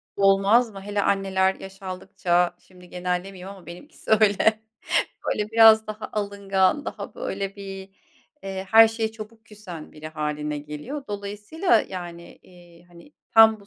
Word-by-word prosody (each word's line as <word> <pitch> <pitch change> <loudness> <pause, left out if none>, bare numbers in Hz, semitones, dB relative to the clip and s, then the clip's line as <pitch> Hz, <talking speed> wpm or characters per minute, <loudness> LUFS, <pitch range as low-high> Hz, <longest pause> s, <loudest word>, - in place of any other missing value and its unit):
Olmaz 200 +4 +4
mı? 195 - -9
Hele 205 +1 -2
anneler 190 -1 +1
yaş 195 +1 -12
aldıkça 180 -1 -1
şimdi 180 -1 -18
genellemeyeyim 180 +1 -4
ama 195 -2 -11
benimkisi 180 - -10
öyle. 215 +1 +4 0.7
Böyle 210 0 -1
biraz 225 -1 +7
daha 215 0 -6
alıngan 200 +4 0
daha - - -7
böyle 205 - -4
bir, 195 -1 -8 0.5
eee, 190 0 -5
her 225 0 +8
şeye 225 0 -3
çabuk 225 0 -11
küsen 195 -7 -10
biri 155 0 -9
hâline 150 -1 -3
geliyor. 150 - -7
Dolayısıyla, 210 - 0
yani, 175 -2 -8
iii, 175 -1 -18
hani, 175 +11 -17 0.2
tam 220 -1 +7
bu 200 - -18
195 Hz, 140 wpm, -24 LUFS, 180-220 Hz, 0.7 s, her